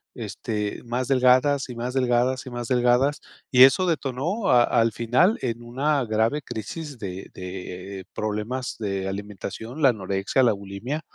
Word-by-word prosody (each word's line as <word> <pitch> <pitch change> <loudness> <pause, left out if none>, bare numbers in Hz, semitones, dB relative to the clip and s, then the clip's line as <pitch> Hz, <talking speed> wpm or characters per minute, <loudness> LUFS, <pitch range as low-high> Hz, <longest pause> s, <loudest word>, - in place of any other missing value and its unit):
este, 105 -2 -4
más 120 +1 -2
delgadas 130 +2 +3
y 125 - -6
más 120 +2 -4
delgadas 125 0 +1
y - - -4
más 120 -1 -5
delgadas, 125 +3 +2 0.3
y 125 0 +8
eso 135 +8 +6
detonó 160 - -1
a 120 -1 +6
al 115 -1 +2
final 125 - +2
en 120 -2 -3
una 135 +4 0
grave 110 +6 +1
crisis 130 - -6
de 95 -2 -6
de 95 +1 -7
problemas 110 +5 -3
de 100 -3 -2
alimentación, 105 +7 -6
la 135 - +7
anorexia, 100 +3 0
la 115 - +4
bulimia, 100 +9 -5
120 Hz, 150 wpm, -24 LUFS, 105-130 Hz, 0.3 s, y